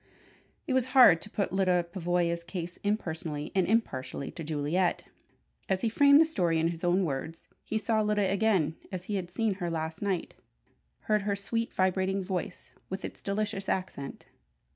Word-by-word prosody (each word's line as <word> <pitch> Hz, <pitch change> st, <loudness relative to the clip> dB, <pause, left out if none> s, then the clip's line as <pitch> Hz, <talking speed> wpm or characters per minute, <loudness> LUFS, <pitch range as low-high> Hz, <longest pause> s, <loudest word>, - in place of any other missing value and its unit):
It 265 Hz, -, -1 dB
was 260 Hz, -2 st, +3 dB
hard 175 Hz, -11 st, +8 dB
to 205 Hz, -, -8 dB
put 200 Hz, -3 st, -2 dB
Lyda 185 Hz, -2 st, +2 dB
Pavoya's 175 Hz, -2 st, 0 dB
case 175 Hz, 0 st, -5 dB
impersonally 160 Hz, -7 st, -3 dB
and 190 Hz, -2 st, +2 dB
impartially 140 Hz, -, -1 dB
to 165 Hz, -, -7 dB
Juliet. 155 Hz, +4 st, 0 dB, 0.7 s
As 190 Hz, -1 st, +1 dB
he 230 Hz, -, +1 dB
framed 280 Hz, +5 st, +6 dB
the 325 Hz, -, +7 dB
story 175 Hz, -, +1 dB
in 165 Hz, +1 st, +2 dB
his 170 Hz, 0 st, -6 dB
own 180 Hz, +2 st, +3 dB
words, 160 Hz, +3 st, -5 dB, 0.2 s
he 220 Hz, -, -2 dB
saw 220 Hz, 0 st, +1 dB
Lyda 210 Hz, -2 st, +1 dB
again 195 Hz, -6 st, +2 dB
as 185 Hz, -2 st, -4 dB
he 205 Hz, -, -5 dB
had 180 Hz, -2 st, -4 dB
seen 215 Hz, +3 st, 0 dB
her 175 Hz, -, -1 dB
last 160 Hz, -1 st, -4 dB
night, 195 Hz, -4 st, -2 dB, 0.7 s
heard 215 Hz, -1 st, +1 dB
her 200 Hz, 0 st, 0 dB
sweet, 230 Hz, +3 st, -2 dB
vibrating 190 Hz, +1 st, +1 dB
voice 185 Hz, 0 st, -4 dB, 0.2 s
with 190 Hz, +1 st, -4 dB
its -, -, -8 dB
delicious 200 Hz, -1 st, -2 dB
accent. 185 Hz, -7 st, -4 dB
185 Hz, 170 wpm, -29 LUFS, 170-210 Hz, 0.7 s, hard